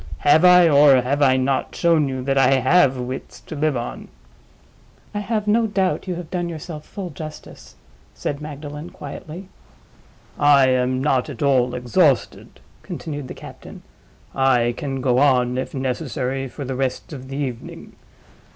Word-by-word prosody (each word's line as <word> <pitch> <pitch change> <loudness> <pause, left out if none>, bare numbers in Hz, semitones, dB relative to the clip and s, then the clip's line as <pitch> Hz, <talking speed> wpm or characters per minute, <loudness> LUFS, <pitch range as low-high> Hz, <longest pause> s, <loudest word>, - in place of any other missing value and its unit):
have 150 +3 +5
I, 180 -1 +7
or 140 -4 +6
have 140 +3 -1
I 130 -2 +4
not, 130 +1 -1
shown 165 -4 +2
you 130 -1 -4
that 135 +1 0
I 135 0 +4
have 135 +1 +3
wits 125 -4 -6
to 135 - -9
live 150 -2 0
on?" 120 0 -6 1.1
"I 205 - -2
have 210 0 -2
no 225 +2 +3
doubt 195 -2 -1
you 180 - -2
have 170 -2 -8
done 175 -2 -2
yourself 155 -1 -8
full 190 -4 -7
justice," 155 +1 -10 0.4
said 145 0 -4
Magdalen, 150 +1 -8
quietly. 180 0 -9 0.9
"I 140 -2 +5
am 130 0 +1
not 130 -4 +1
at - - -5
all 130 -3 +2
exhausted," 130 +2 0 0.2
continued 145 -4 -6
the - - -8
captain. - - -12 0.5
"I 125 -3 +2
can 135 -1 -4
go 125 -1 +2
on, 125 -3 +3
if 130 - -5
necessary, 135 0 -3
for 140 +2 -8
the 130 - -4
rest 130 +3 -3
of 130 -2 -9
the 135 +1 -6
evening. 130 -5 -6
140 Hz, 160 wpm, -21 LUFS, 130-155 Hz, 1.1 s, I